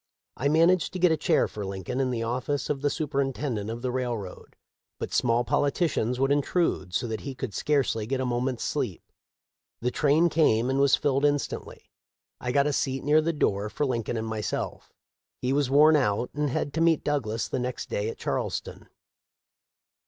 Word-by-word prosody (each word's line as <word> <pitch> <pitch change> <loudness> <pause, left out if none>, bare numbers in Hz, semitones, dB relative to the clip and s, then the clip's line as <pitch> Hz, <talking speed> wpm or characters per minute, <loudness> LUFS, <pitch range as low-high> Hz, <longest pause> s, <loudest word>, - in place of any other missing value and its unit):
I 140 - 0
managed 165 +3 +3
to 185 - -4
get 180 -1 +4
a - - +4
chair 160 +2 +2
for 105 - -6
Lincoln 95 +5 -4
in 130 -1 +1
the 115 -2 -2
office 125 +5 -2
of 140 -2 -3
the 145 - +2
superintendent 135 -6 -2
of 115 +2 -5
the 125 - -1
railroad, 120 -7 -4 0.4
but - - -5
small 120 0 +2
politicians 140 -3 0
would 135 +1 +2
intrude 145 - 0
so - - 0
that 110 -2 -3
he 135 -2 -6
could 125 -5 -5
scarcely 130 -7 0
get 135 +2 -1
a 130 - -1
moment's 125 0 -1
sleep. - - -2 0.8
The 125 +1 -1
train 150 +5 +3
came 130 -6 +3
and 135 - +1
was 140 -1 +5
filled 140 -1 0
instantly. 145 -1 -2 0.5
I 125 - -2
got 140 +2 +3
a 150 - +1
seat 135 -1 -1
near 150 +2 +4
the 165 +2 0
door 105 -9 0
for 145 - -1
Lincoln 120 -3 -2
and 110 - -2
myself. 110 -1 -4 0.5
He 130 +1 0
was 140 -2 +1
worn 150 +3 +6
out, 115 -4 +1
and 150 0 -1
had 140 +2 -2
to 160 - -1
meet 165 -1 +3
Douglas 120 -7 -1
the 130 - -2
next 125 0 -4
day 105 +2 -2
at - - -7
Charleston. - - -4
135 Hz, 190 wpm, -27 LUFS, 115-145 Hz, 0.8 s, worn